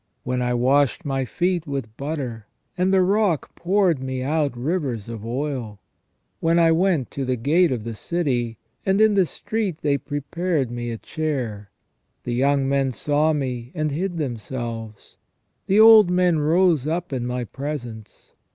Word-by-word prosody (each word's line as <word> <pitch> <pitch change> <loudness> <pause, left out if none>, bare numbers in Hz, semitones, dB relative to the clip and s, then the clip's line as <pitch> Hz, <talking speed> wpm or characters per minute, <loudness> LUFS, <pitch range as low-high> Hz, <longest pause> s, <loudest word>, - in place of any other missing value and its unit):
When 125 0 -1
I 125 0 0
washed 140 +6 +2
my 135 -2 -1
feet 175 +4 -1
with 135 -6 -4
butter, 130 -7 -5 0.3
and 185 +1 +1
the 190 -1 +4
rock 195 - +1
poured 180 -5 +1
me 130 -1 -3
out 145 -2 0
rivers 130 - -2
of 115 -2 -7
oil. 120 -3 -4 0.6
When 165 +1 +2
I 165 -1 +5
went 165 -5 +1
to 140 - -3
the 130 -1 0
gate 155 +8 +2
of 120 -4 -2
the 115 0 -5
city, 120 -5 -2 0.3
and 190 +1 +2
in 220 -1 +5
the 190 -3 +3
street 205 -6 -3
they 140 -1 +2
prepared 145 0 -2
me 120 0 -4
a 115 - -4
chair. 125 -10 -4 0.5
The 120 - -3
young 135 +2 +2
men 135 -1 +1
saw 150 +4 +1
me, 125 -5 -3
and 155 -2 -1
hid 175 +4 -2
themselves: 115 -5 -5 0.5
the 200 +3 +4
old 220 -3 +8
men 180 -2 +2
rose 160 -1 +3
up 165 -1 -2
in 125 -2 -2
my 125 0 -2
presence. 120 -4 -7
140 Hz, 160 wpm, -23 LUFS, 125-170 Hz, 0.6 s, old